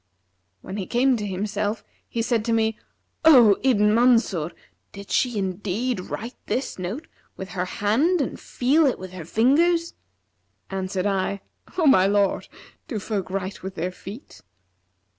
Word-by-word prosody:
When 190 - -7
he 190 - -4
came 255 +2 +3
to 210 -2 -4
himself, 205 +2 -2 0.3
he 230 - -2
said 230 -1 +1
to 230 - +1
me, 220 -1 +1 0.5
'O 245 -11 +7
Ibn 210 -5 +3
Mansur, 230 -9 +3 0.4
did 200 0 -10
she 245 -4 +1
indeed 200 +5 -2
write 230 +6 -6
this 260 -6 -2
note 205 - -4 0.3
with 190 - -7
her 180 -2 -2
hand 240 - +1
and 275 - -2
feel 285 +5 +2
it 260 - 0
with 185 0 -9
her 180 -3 -8
fingers?' 330 - +2 0.8
Answered 190 0 -2
I, 195 0 -1 0.4
'O 340 - +2
my 190 -9 +6
lord, 200 0 +1 0.4
do 255 -9 -3
folk 205 -2 -3
write 190 0 -4
with 190 +1 -7
their 180 +2 -2
feet?' 200 +8 -11
210 Hz, 150 wpm, -24 LUFS, 190-250 Hz, 0.8 s, O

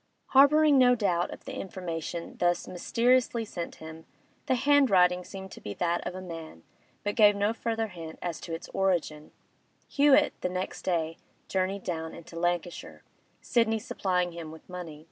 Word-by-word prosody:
Harbouring 285 +1 +6
no 250 -1 +6
doubt 180 -6 0
of - - -10
the - - -6
information 170 -2 -5
thus 175 0 +1
mysteriously 235 +5 +1
sent 175 -5 -6
him—the 160 +10 -6
handwriting 225 -10 +4
seemed 190 0 -9
to - - -11
be 100 - -6
that 175 0 0
of 180 - -5
a 185 - -6
man, 165 - -9 0.4
but 205 - -1
gave 210 -3 +6
no 205 +2 +1
further 225 -1 -2
hint 165 -3 -9
as 175 -2 -4
to - - -8
its 165 +1 -5
origin—Hewett 195 - 0
the 180 - 0
next 185 +1 -4
day 165 -2 -1 0.3
journeyed 190 +1 -1
down 160 -2 -4
into 165 0 -12
Lancashire, 170 - -3 0.4
Sidney 230 -2 +2
supplying 180 -5 -1
him 165 -2 -7
with 160 0 -13
money. 175 -4 -8
180 Hz, 155 wpm, -28 LUFS, 170-225 Hz, 0.4 s, Harbouring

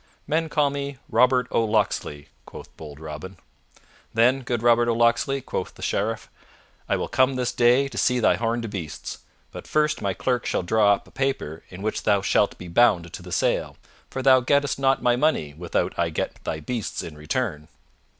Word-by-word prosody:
"Men 160 +1 0
call 145 -1 +2
me 140 -1 -4
Robert 125 0 +4
o' 115 - +2
Locksley," 105 -9 -1 0.2
quoth - - -12
bold 75 -2 -10
Robin. 80 +4 -8 0.8
"Then, 125 +4 +4
good 120 -2 -3
Robert 120 0 +4
o' 115 - +1
Locksley," 120 +4 +2
quoth 95 - -5
the - - -10
Sheriff, 110 +3 -1 0.6
"I - - +3
will - - -2
come 130 +1 +2
this 125 -1 -1
day 125 +3 +4
to 135 - -5
see 125 0 +2
thy 115 - +3
horned 115 0 -1
beasts. 85 -7 -6 0.3
But - - -9
first 150 0 +1
my 100 -2 -1
clerk 125 -2 -1
shall - - 0
draw 105 +2 +4
up - - -14
a - - -18
paper 135 - -2
in 95 +2 -9
which 110 - -2
thou 100 -2 +2
shalt 100 - +2
be 90 - -9
bound 85 -3 +3
to - - -7
the - - -11
sale, - - 0 0.3
for 130 - -4
thou 130 -1 +7
gettest 140 +3 +1
not 135 -2 +2
my 120 -1 +4
money 120 - +1
without 85 +3 -2
I - - +2
get - - -4
thy 80 - -4
beasts 115 +6 -4
in 80 - -8
return." 75 - -3
115 Hz, 190 wpm, -24 LUFS, 95-130 Hz, 0.8 s, thou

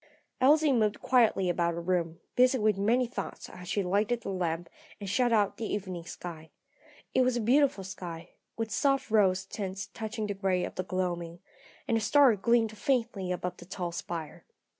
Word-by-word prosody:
Elsie 300 +3 +5
moved 215 -4 +1
quietly 230 -7 +3
about 170 -1 +1
her - - -3
room, 170 -2 -1 0.2
busy 255 +1 +5
with 215 -3 +2
many 230 +6 +2
thoughts 240 - -6
as 180 -1 -10
she 200 +1 0
lighted 210 +6 +1
the - - -5
lamp 170 -2 -2 0.3
and 200 - -6
shut 240 +5 +2
out 210 -3 +2
the 225 - -4
evening 185 -4 -4
sky. 160 -3 -8 0.6
It 260 - +4
was 255 -1 +2
a - - 0
beautiful 250 -2 +3
sky, 175 -3 -7 0.3
with 225 -1 -3
soft 275 +2 +1
rose 190 -3 +3
tints 195 -1 -5
touching 220 0 -4
the 205 - -2
grey 190 -2 0
of - - -4
the - - -2
gloaming, 175 -2 -3 0.5
and 230 - +2
a - - -1
star 270 +1 +5
gleamed 225 +1 +2
faintly 220 -5 -1
above 180 0 -3
the 175 - -12
tall 180 -1 -4
spire. 170 -2 -6
200 Hz, 185 wpm, -29 LUFS, 180-235 Hz, 0.6 s, Elsie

